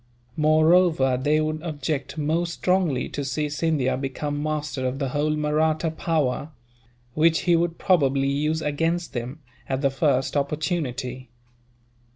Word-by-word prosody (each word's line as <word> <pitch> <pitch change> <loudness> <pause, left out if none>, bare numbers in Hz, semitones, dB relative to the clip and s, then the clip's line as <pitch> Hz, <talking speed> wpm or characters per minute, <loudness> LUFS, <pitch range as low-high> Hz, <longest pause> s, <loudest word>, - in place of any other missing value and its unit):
Moreover, 155 -2 +4
they 145 +4 +1
would 155 0 -2
object 145 -3 -4
most 165 +3 0
strongly 180 -10 +1
to 145 - -4
see 145 +3 -2
Scindia 145 -4 0
become 145 +2 -3
master 150 -3 -3
of 130 +1 -3
the 135 -2 -2
whole 150 +3 0
Mahratta 155 +2 +1
power; 155 -4 -1 0.6
which 160 +2 +3
he 175 -1 +3
would 170 0 0
probably 140 -7 +2
use 150 +3 0
against 165 +4 -1
them, 125 +5 -5 0.3
at 130 0 -1
the 140 -2 +2
first 135 -1 +1
opportunity. 140 -4 -2
150 Hz, 135 wpm, -24 LUFS, 135-160 Hz, 0.6 s, Moreover